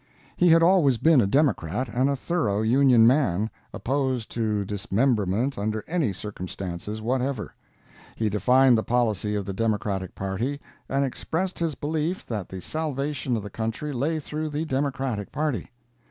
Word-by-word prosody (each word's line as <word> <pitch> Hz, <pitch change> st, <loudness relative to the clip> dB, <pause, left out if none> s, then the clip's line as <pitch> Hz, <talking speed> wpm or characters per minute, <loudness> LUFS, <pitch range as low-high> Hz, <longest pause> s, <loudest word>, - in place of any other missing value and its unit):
He 175 Hz, -, +4 dB
had 165 Hz, 0 st, +6 dB
always 165 Hz, -8 st, +4 dB
been 155 Hz, 0 st, +5 dB
a 100 Hz, -, +1 dB
Democrat 125 Hz, -, +1 dB
and 125 Hz, +4 st, +1 dB
a 140 Hz, -, +1 dB
thorough 125 Hz, -, 0 dB
Union 125 Hz, 0 st, +5 dB
man, 115 Hz, -, +2 dB, 0.2 s
opposed 130 Hz, -3 st, -1 dB
to 105 Hz, -3 st, -1 dB
dismemberment 105 Hz, +3 st, 0 dB
under 110 Hz, +1 st, -2 dB
any 160 Hz, -, 0 dB
circumstances 95 Hz, +1 st, -6 dB
whatever. 125 Hz, -1 st, -1 dB, 0.6 s
He 110 Hz, -, 0 dB
defined 125 Hz, +4 st, +4 dB
the -, -, -2 dB
policy 110 Hz, -4 st, 0 dB
of 100 Hz, -2 st, -2 dB
the 100 Hz, -, -4 dB
Democratic 100 Hz, -3 st, -1 dB
party, 110 Hz, +9 st, -2 dB, 0.3 s
and 140 Hz, +1 st, +1 dB
expressed 170 Hz, +7 st, -3 dB
his 165 Hz, -4 st, -1 dB
belief 155 Hz, +6 st, -2 dB
that 105 Hz, -6 st, -4 dB
the 95 Hz, -1 st, -7 dB
salvation 145 Hz, -, -2 dB
of 105 Hz, -, -5 dB
the 100 Hz, -, -8 dB
country 115 Hz, +8 st, -3 dB
lay 150 Hz, +6 st, 0 dB
through 155 Hz, +1 st, -4 dB
the 150 Hz, +2 st, -2 dB
Democratic 135 Hz, -7 st, -2 dB
party. 145 Hz, -, -2 dB
125 Hz, 155 wpm, -25 LUFS, 105-145 Hz, 0.6 s, had